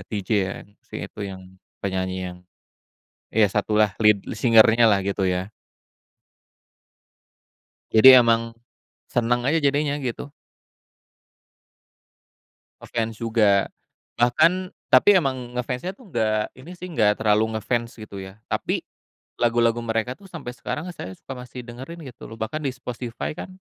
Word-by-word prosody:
TJ 100 -3 -5 0.2
ya, 95 - -4 0.3
si - - -15
itu - - -11
yang 95 -1 -9 0.4
penyanyi 95 -1 -2
yang 90 - -12 1.0
iya 110 0 +5
satu 105 +2 0
lah, 105 -2 +4
lead 105 -2 +4
singer-nya 115 0 +6
lah, 100 -2 +3
gitu 100 0 -1
ya. 90 +1 -1 2.4
Jadi 110 +4 +8
emang 115 -1 +3 0.6
seneng 120 +1 +1
aja 150 +5 +2
jadinya, 145 +1 +1
gitu. 130 +2 -5 2.5
Nge-fans 115 -1 -3
juga. 110 -4 +3 0.5
Bahkan 125 +8 +4 0.4
tapi 205 - +6
emang 130 -6 -3
nge-fans-nya 125 +8 -3
tuh 235 +2 -18
nggak 110 -5 0
ini 145 +7 -12
sih, 180 - -7
nggak 105 -10 +2
terlalu 110 +1 +2
ngefans 115 +2 -2
gitu 110 -2 -9
ya. 95 +2 -11
Tapi - - -2 0.6
lagu-lagu 120 -1 +2
mereka 115 +2 -1
tuh 200 - -15
sampai 160 -9 -7
sekarang 155 +8 -5
saya 95 - -7
suka 135 - -9
masih 125 0 -9
dengerin 130 +8 -9
gitu 125 - -12
loh, - - -10
bahkan 110 +7 -3
di 135 - 0
spotify 125 +2 -6
kan 185 - -8
115 Hz, 130 wpm, -23 LUFS, 105-130 Hz, 2.5 s, Jadi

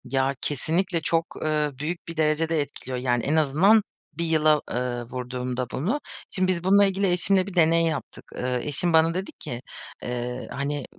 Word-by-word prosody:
Ya, 135 0 +1
kesinlikle 165 +5 0
çok, 165 +1 +1 0.2
eee, 150 -1 +1
büyük 165 +4 -4
bir 165 -1 -7
derecede 160 +1 +2
etkiliyor. 130 -3 -5
Yani, 120 -2 0
en 150 - +1
azından 160 +9 +5 0.3
1 170 - -2
yıla, 155 -2 +3
eee, 120 -1 -2
vurduğumda 125 +1 -4
bunu 210 - -1 0.3
Şimdi 185 0 +1
biz 170 - -7
bununla 200 +2 +6
ilgili 195 -1 +1
eşimle 185 +2 +2
bir 200 - -7
deney 165 -1 +4
yaptık. 155 -3 -4
Eee, 125 0 -1
eşim 165 +4 0
bana 160 +1 +5
dedi 185 +2 -4
ki, 120 0 -6 0.4
eee, 125 0 -4
"Hani, 140 -1 -3
155 Hz, 170 wpm, -25 LUFS, 130-175 Hz, 0.4 s, bununla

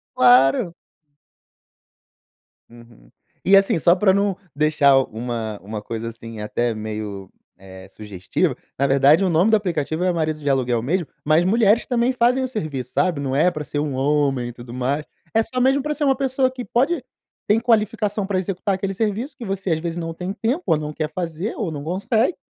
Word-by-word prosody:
Claro. 130 +7 +5 2.0
Uhum. 115 - -17 0.3
E, 195 +2 +6
assim, 195 -3 +3
só 170 +2 +5
pra 190 0 +3
não 200 -1 +1 0.2
deixar 145 -2 +4
uma 110 -2 -4
uma 105 +1 -6
coisa, 115 +2 -5
assim, 115 -1 -10
até 115 +2 -1
meio, 105 -3 -6 0.3
eh, 95 0 -13
sugestiva, 100 -4 -2 0.2
na 140 - +1
verdade 140 +6 +4
o 185 - +2
nome 175 +6 +3
do 220 - +5
aplicativo 165 -4 -2
é 185 - +2
marido 155 -2 -1
de 145 -1 -2
aluguel 125 -3 +1
mesmo, 170 +4 -1 0.2
mas 155 +3 +4
mulheres 220 +2 +3
também 245 0 +1
fazem 250 +2 +2
o 260 - -1
serviço, 150 - -5
sabe, 175 -5 +1
não 135 -1 -2
é 165 +5 +4
pra 155 -3 -5
ser 145 - -4
um 145 -3 -2
homem 135 -3 +1
e - - -9
tudo 120 0 -11
mais. 135 +4 -1 0.3
É 225 - +4
só 255 +3 -3
mesmo 270 +2 +3
pra 300 +2 -2
ser 300 +1 -3
uma 270 -2 +3
pessoa 260 -1 0
que 255 -1 -7
pode 275 +4 0 0.4
tem 215 +2 +4
qualificação 215 -3 0
para 195 -2 0
executar 190 +1 -1
aquele 195 +1 -3
serviço 220 +6 -2
que 245 - -9
você, 195 -3 -3
às 160 - +1
vezes, 170 +1 -4
não 165 -1 -4
tem 180 +3 -5
tempo, 245 - -1
ou 160 - +3
não 150 0 -5
quer 155 0 -3
fazer, 175 +4 -4
ou 190 -8 -2
não 145 -2 -6
consegue, 220 - 0
165 Hz, 190 wpm, -21 LUFS, 130-210 Hz, 2.0 s, E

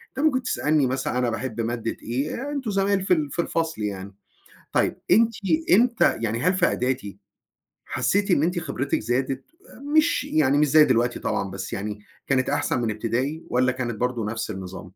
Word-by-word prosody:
طَب 270 - -2
أنت - - +4
ممكن 265 -4 +3
تسألني 150 - +1
مثلًا 130 -1 -2
أنا 125 -1 +1
باحب 115 -1 -3
مادة 115 0 -3
إيه، 145 - -3
أنتم 270 -7 -3
زمايل 195 0 +1
في 185 - +4
ال 150 -5 0
في - - 0
الفصل 165 -7 -2
يعني، 100 -1 -4 0.6
طيب - - +1
أنتِ 225 +3 +5 0.4
إمتى 235 - +3
يعني 115 +1 -1
هل 180 +6 +2
في 180 -2 +3
اعدادي 125 - -2 0.7
حسّيتِ 195 +11 0
إن 150 - +3
أنتِ 175 +1 0
خبرتِك 140 -3 -2
زادت، 130 +4 -1 0.5
مش 315 +2 +4
يعني 145 -2 +2
مش 150 +1 +4
زي 155 +2 +7
دلوقتي 120 -2 +1
طبعًا 100 -3 -2
بس 95 0 -6
يعني، 105 +1 -4 0.3
كانت 130 -1 +1
أحسن 125 - 0
من 115 - 0
ابتدائي، 125 +9 -2
والّا 130 +1 +2
كانت 120 -3 -3
برضه 120 0 -1
نفْس 115 +1 -3
النظام؟ 95 -2 -7
130 Hz, 180 wpm, -24 LUFS, 115-170 Hz, 0.7 s, زي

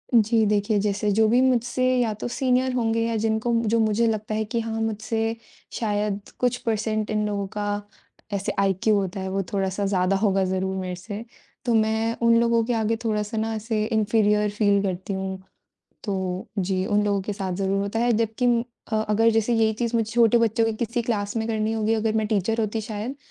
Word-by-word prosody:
जी, 225 0 +4
देखिए 210 0 +1
जैसे 205 +1 0
जो 220 +2 +4
भी 240 +3 +4
मुझसे 255 -1 +1 0.2
या 225 -3 +1
तो - - -2
सीनियर 255 +1 +1
होंगे 230 -2 +1
या 230 - -1
जिनको 220 +2 0 0.2
जो 230 +1 +2
मुझे 220 +1 +2
लगता 215 -1 -2
है 220 - 0
कि 230 +2 -2
हाँ, 225 0 -3
मुझसे 225 +1 -1 0.4
शायद 205 -2 -2
कुछ 245 -1 +1
परसेंट 215 -1 -1
इन 210 0 0
लोगों 200 -1 -2
का 205 0 -1 0.5
ऐसे 200 0 -1
आईक्यू 195 +2 +2
होता 195 -1 -1
है 190 0 -3
वो 195 +1 -1
थोड़ा-सा 195 0 -1
ज़्यादा 195 -1 +1
होगा 195 -2 +2
ज़रूर 190 +1 -1
मेरे 185 -1 -3
से 200 +4 -7 0.4
तो 240 - +2
मैं, 220 +1 +1
उन 230 0 +5
लोगों 235 -1 +3
के 245 - 0
आगे 225 0 +1
थोड़ा-सा 210 0 -1
ना 225 +1 -1
ऐसे 215 0 -1
इन्फीरियर 210 -1 +2
फ़ील 205 -1 +2
करती 190 +1 -3
हूँ। 190 0 -4 0.6
तो 190 -3 -3
जी, 185 0 0
उन 210 -1 +2
लोगों 200 -1 +1
के 205 - -3
साथ 195 -2 -3
ज़रूर 195 0 0
होता 200 +3 -2
है 240 +1 +2
जबकि 225 +2 0 0.5
अ, - - +2
अगर 225 +2 +4
जैसे 225 +1 +1
यही 220 -1 +3
चीज़ 235 +1 -2
मुझे 225 -1 0
छोटे 235 0 +5
बच्चों 230 0 +2
की 225 - +1
किसी 235 +1 -1
क्लास 210 -2 -2
में 220 0 -1
करनी 220 -1 0
होगी 220 0 +1
अगर 220 0 0
मैं 220 -1 +1
टीचर 220 +1 0
होती 220 0 -1
शायद, 215 +5 -5
215 Hz, 200 wpm, -24 LUFS, 200-225 Hz, 0.6 s, उन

